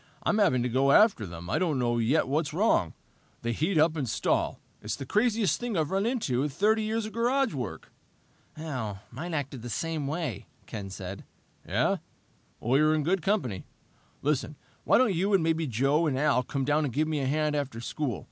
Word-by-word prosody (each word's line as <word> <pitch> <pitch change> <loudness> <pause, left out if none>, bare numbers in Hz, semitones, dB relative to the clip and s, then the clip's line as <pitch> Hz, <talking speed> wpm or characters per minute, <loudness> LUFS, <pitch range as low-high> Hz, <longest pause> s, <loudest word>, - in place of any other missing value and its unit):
"I'm 215 - +2
having 145 - +3
to - - +1
go 135 +3 +2
out 140 - +8
after 190 - 0
them. 85 0 -8
I - - 0
don't 165 -6 +1
know 120 -1 +1
yet 130 +8 +2
what's 150 +2 -1
wrong. 175 - +2 0.5
They 120 - 0
heat 160 - 0
up 155 +1 +4
and 140 -6 -2
stall. - - 0 0.2
It's 105 - -3
the 135 - -7
craziest 215 - +2
thing 240 -5 -2
I've 155 +1 0
run 195 +3 +1
into 210 - 0
in 150 - 0
30 215 +9 +2
years 220 +1 -1
of 215 - -7
garage 250 +1 +1
work." 125 -8 -6 0.7
"Mine 130 - -5
acted 140 -4 -4
the 120 - -7
same 160 +3 -2
way," 145 - -3 0.2
Ken 100 -4 -6
said. 95 0 -7 0.4
"Yeah? - - +1 0.6
Well, 130 +4 +2
you're 155 +1 +4
in 155 - 0
good 180 +4 +1
company. 150 - -1 0.6
Listen, 150 +1 0 0.3
why - - +5
don't 245 -5 +3
you 195 +4 +2
and 180 - +2
maybe 160 -1 +1
Joe 135 +7 +2
and 135 -3 0
Al 140 -3 +3
come 135 +1 -3
down 150 +2 +2
and 140 - -1
give 155 +5 0
me 155 -2 -1
a 135 - -1
hand 150 +1 +1
after 135 -5 -3
school? 120 -1 -3
150 Hz, 205 wpm, -28 LUFS, 125-175 Hz, 0.7 s, out